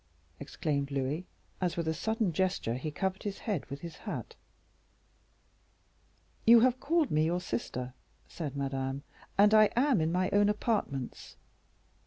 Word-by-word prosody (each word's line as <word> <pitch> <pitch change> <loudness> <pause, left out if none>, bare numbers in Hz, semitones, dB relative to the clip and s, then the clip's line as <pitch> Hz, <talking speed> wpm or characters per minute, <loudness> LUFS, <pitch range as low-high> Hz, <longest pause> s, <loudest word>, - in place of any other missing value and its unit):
exclaimed 140 -3 -2
Louis, 140 +5 -2 0.3
as, 180 -2 0
with 170 -1 -1
a 160 - +1
sudden 220 +2 0
gesture, 185 -9 0
he 130 +5 -3
covered 190 +5 -2
his 205 -1 -4
head 200 - -3
with 140 0 -7
his 170 -1 -8
hat. - - -6 2.1
"You 235 0 +8
have 255 +1 +3
called 320 +1 +1
me 155 +1 +3
your 175 +2 +1
sister," 125 -3 -4 0.3
said 150 -5 -5
Madame, 135 0 -2 0.3
"and 205 +2 +6
I 215 0 +8
am 250 - +3
in 160 +1 +1
my 185 +2 +1
own 205 0 +5
apartments." 210 - -2
175 Hz, 145 wpm, -31 LUFS, 140-210 Hz, 2.1 s, You